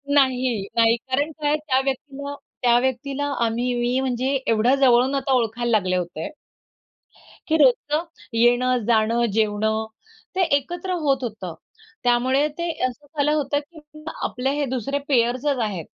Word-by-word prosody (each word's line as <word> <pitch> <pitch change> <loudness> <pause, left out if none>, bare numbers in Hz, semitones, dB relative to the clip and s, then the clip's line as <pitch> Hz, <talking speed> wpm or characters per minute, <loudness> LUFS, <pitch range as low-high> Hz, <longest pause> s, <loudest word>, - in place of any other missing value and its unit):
नाही, 255 -5 +2
नाही 230 0 +5
कारण 270 +6 -2
काय? 295 +1 +2
त्या 295 -4 0
व्यक्तीला 280 +1 -4 0.3
त्या 240 -1 +4
व्यक्तीला 265 +2 -2 0.2
आम्ही 240 +2 -1
मी 245 +2 +1
म्हणजे 260 0 -1 0.2
एवढ्या 230 +4 +3
जवळून 260 0 +4
आता 270 0 0
ओळखायला 240 -1 0
लागले 185 -4 +2
होते 175 -3 -3 1.2
की 320 - +2
रोजचं 295 +3 +3 0.3
येणं-जाणं, 235 -1 +2
जेवणं 220 0 +1 0.5
ते 375 - +1 0.2
एकत्र 350 +6 -5
होत 270 -2 +1
होतं. 210 -7 -5 0.5
त्यामुळे 255 +4 +3
ते 340 0 -2 0.2
असं 255 +3 -5
झालं 290 +1 +2
होतं 290 -1 0
की 315 +2 -14 0.4
आपले 250 +2 -1
हे 290 -1 0
दुसरे 265 +2 -2
पेयर्सच 255 +2 +1
आहेत. 190 -7 -3
255 Hz, 135 wpm, -23 LUFS, 235-280 Hz, 1.2 s, नाही